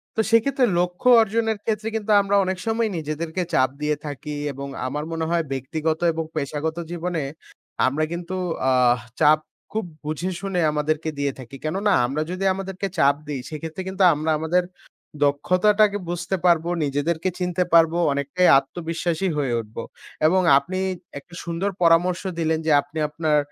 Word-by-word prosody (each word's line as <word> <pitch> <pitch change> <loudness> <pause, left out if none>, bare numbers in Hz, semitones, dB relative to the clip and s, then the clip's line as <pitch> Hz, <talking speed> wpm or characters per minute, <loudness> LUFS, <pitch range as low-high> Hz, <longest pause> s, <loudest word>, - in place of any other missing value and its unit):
তো - - -3
সেইক্ষেত্রে 250 +3 +3
লক্ষ্য 180 +7 +1
অর্জনের 225 0 0
ক্ষেত্রে 220 0 -1
কিন্তু 220 -1 -1
আমরা 200 0 0
অনেক 185 0 -2
সময় 225 0 +1
নিজেদেরকে 160 +3 -3
চাপ 130 0 +4
দিয়ে 150 0 +1
থাকি 150 +1 -6 0.2
এবং 140 +1 -7 0.2
আমার 150 +3 -3
মনে 165 0 -2
হয় 170 0 +1
ব্যক্তিগত 155 +4 -2
এবং 160 0 -2
পেশাগত 155 +2 -2
জীবনে 175 -2 -2 0.6
আমরা 145 +4 0
কিন্তু 170 +2 -4 0.4
আহ 125 -1 +4 0.2
চাপ 155 0 +5 0.3
খুব 220 -1 -2 0.2
বুঝে 155 +4 -2
শুনে 195 -2 -2
আমাদেরকে 155 +1 -1
দিয়ে 140 -1 0
থাকি। 130 +1 -10
কেননা 195 +7 0
আমরা 140 +5 -2
যদি 185 +1 -4
আমাদেরকে 195 0 -4
চাপ 140 -2 +4
দিই, 140 -3 -3
সেক্ষেত্রে 160 +3 -6
কিন্তু 190 +1 0
আমরা 155 +2 -1
আমাদের 170 +3 +1 0.6
দক্ষতাটাকে 200 +8 +3
বুঝতে 175 +2 -2
পারবো, 170 -1 +3 0.2
নিজেদেরকে 160 +5 -1
চিনতে 180 0 0
পারবো, 165 0 +5 0.2
অনেকটাই 140 +6 +1
আত্মবিশ্বাসী 170 +3 -3
হয়ে 135 -4 0
উঠবো 115 +1 -7 0.4
এবং 185 +3 +3 0.2
আপনি 180 +7 -2 0.4
একটা 170 +5 -21
সুন্দর 170 +4 -1
পরামর্শ 175 +2 +4 0.2
দিলেন, 160 -1 +1
যে - - +3
আপনি 145 +3 -8
আপনার 155 0 +1
165 Hz, 155 wpm, -23 LUFS, 150-185 Hz, 0.6 s, চাপ